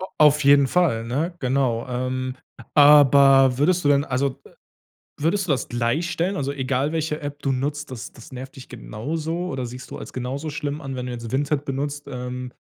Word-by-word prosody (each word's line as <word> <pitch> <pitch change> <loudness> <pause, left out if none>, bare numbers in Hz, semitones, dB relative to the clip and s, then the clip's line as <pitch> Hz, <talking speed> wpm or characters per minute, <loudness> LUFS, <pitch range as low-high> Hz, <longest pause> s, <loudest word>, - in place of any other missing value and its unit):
A 185 - -4
auf 150 -1 +5
jeden 140 -1 +6
Fall, 140 -10 +1
ne? 150 +9 -2
Genau. 130 -3 0
Ähm, 130 +1 -3 0.4
aber 140 -3 +6
würdest 180 +3 +2
du - - +3
denn 140 0 +4
also, 130 0 -2
äh, - - -16 0.7
würdest 180 +5 +1
du 150 - +2
das 130 - -2
gleich 120 +9 -1
stellen? 175 +4 -1
Also 140 -2 -2
egal, 135 +2 -1
welche 155 -1 -2
App 145 0 -6
du 135 - +1
nutzt, 145 +3 -3
das 115 -5 -7
das 120 +2 -14
nervt 130 +2 -8
dich 130 - -11
genauso 160 +9 -4
oder 130 -2 -3
siehst 125 +2 -9
du - - -7
als - - -9
genauso 135 +5 -4
schlimm 145 0 -4
an, 135 -3 -6
wenn 125 0 -4
du 125 - -4
jetzt 115 -1 -7
Vinted 145 +1 0
benutzt, 145 +1 -4
ähm, 125 0 -6
140 Hz, 200 wpm, -23 LUFS, 125-150 Hz, 0.7 s, jeden